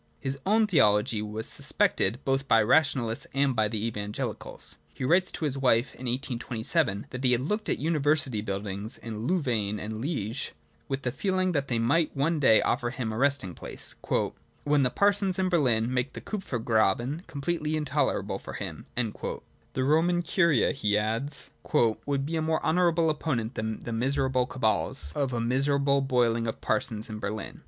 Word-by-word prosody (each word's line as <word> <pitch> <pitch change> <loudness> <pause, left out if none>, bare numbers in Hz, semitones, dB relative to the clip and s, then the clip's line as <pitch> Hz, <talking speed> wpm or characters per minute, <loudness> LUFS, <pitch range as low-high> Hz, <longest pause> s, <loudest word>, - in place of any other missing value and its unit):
His 135 0 -3
own 220 +2 +4
theology 105 - +3
was 105 +1 -4
suspected 120 - +3
both 135 0 0
by 115 -3 +5
the - - +1
Rationa 135 -1 +3
lists 115 0 -1
and 135 -2 +2
by 110 -1 +2
the 110 0 -2
Evangelicals. 105 -2 -5 0.2
He - - -6
writes 180 +7 +3
to 160 - -3
his 140 -2 -1
wife 130 0 +2
(in 130 - -7
1827) 120 - -1
that 130 +1 -6
he 125 -1 +4
had 120 - +1
looked 210 +10 -2
at - - +1
the - - -8
university 150 -6 +2
buildings 100 +1 -4
in 115 0 -6
Louvain 115 - 0
and 110 +1 -5
Liege 135 -4 -2 0.3
with 135 0 -3
the 125 - -1
feeling 185 +5 0
that 140 -4 -1
they 120 - 0
might 140 +7 +1
one 155 +3 +1
day 110 -6 +5
afford 120 +1 -1
him 115 -4 -3
a - - -4
resting 135 -9 +1
place - - -4 0.4
' - - -31
when 145 0 +3
the 125 - +3
parsons 200 - +2
in 190 -1 +1
Berlin 125 -8 +2
make 125 +1 -1
the - - -6
Kupfergraben 120 - 0
completely 155 +2 -2
intolerable 150 -2 -1
for - - -8
him^' - - -6
'The 125 +2 -5
Roman 165 +5 +2
Curia,' 170 - +3
he 105 -8 +1
adds, 115 +7 -2 0.2
'would 135 +5 +1
be 165 +3 -2
a - - 0
more 160 0 0
honourable 170 -1 +3
opponent 130 -7 -2
than 110 0 -4
the 115 - -5
miserable 130 +1 +1
cabals 110 - -1
of 140 -3 -1
a 120 - -2
miserable 140 +3 +2
boiling 120 -3 +1
of 110 - -4
parsons 110 0 -1
in 110 -1 -6
Berlin.' 105 +1 -5
130 Hz, 180 wpm, -27 LUFS, 110-150 Hz, 0.4 s, by